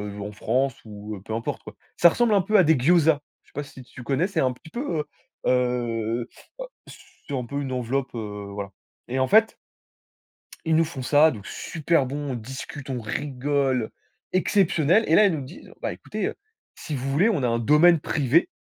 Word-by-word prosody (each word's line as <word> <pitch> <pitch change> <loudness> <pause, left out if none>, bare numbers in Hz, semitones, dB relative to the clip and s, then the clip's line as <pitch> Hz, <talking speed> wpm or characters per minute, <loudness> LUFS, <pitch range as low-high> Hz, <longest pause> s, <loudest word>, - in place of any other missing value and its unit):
heu, 105 - -7
en 105 +1 -5
France 125 +5 0
ou 105 -1 -8
peu 110 - -5
importe 115 +1 -3
quoi. - - -11 0.2
Ça 170 - +7
ressemble 235 +5 +2
un 200 - +4
peu 215 +3 +2
à 190 - +7
des 160 -2 +4
gyozas! 160 +2 +4 0.2
Je - - -36
sais - - -27
pas 145 - -3
si 135 -2 -12
tu 125 0 -12
connais? 140 +8 +1
C'est 195 -5 -2
un 130 -1 +1
petit 125 - -16
peu, 180 - -3
heu, 150 - -2 0.4
heu, 120 -2 0
heu, 115 - -6 0.6
c'est 145 - -11
un 125 -2 -2
peu 140 +4 -3
une 135 -2 -4
enveloppe, 125 +1 -2
heu, 105 -3 -6
voilà, 100 -1 -5 0.4
et 130 +2 -2
en 130 - +2
fait 220 +2 +4 1.1
ils 160 0 +2
nous 165 - +5
font 150 -4 -7
ça 150 +4 +5
donc, 105 -6 -9
super 160 -3 0
bon, 145 +2 -4
on - - -3
discute, 135 +4 -8
on 130 -2 -2
rigole, 135 0 -1 0.4
exceptionnel! 185 0 +3
Et 160 - +4
là, 215 - +7
ils 195 - +3
nous 155 - -3
disent: 130 - -11
«Ben - - -1
écoutez, - - -4
heu, - - -5 0.4
si 155 - -5
vous 135 +1 -3
voulez, 175 +11 +3
on 175 - 0
a - - +3
un 115 0 0
domaine 155 +7 +5
privé, 145 +2 +2
135 Hz, 210 wpm, -24 LUFS, 120-160 Hz, 1.1 s, Ça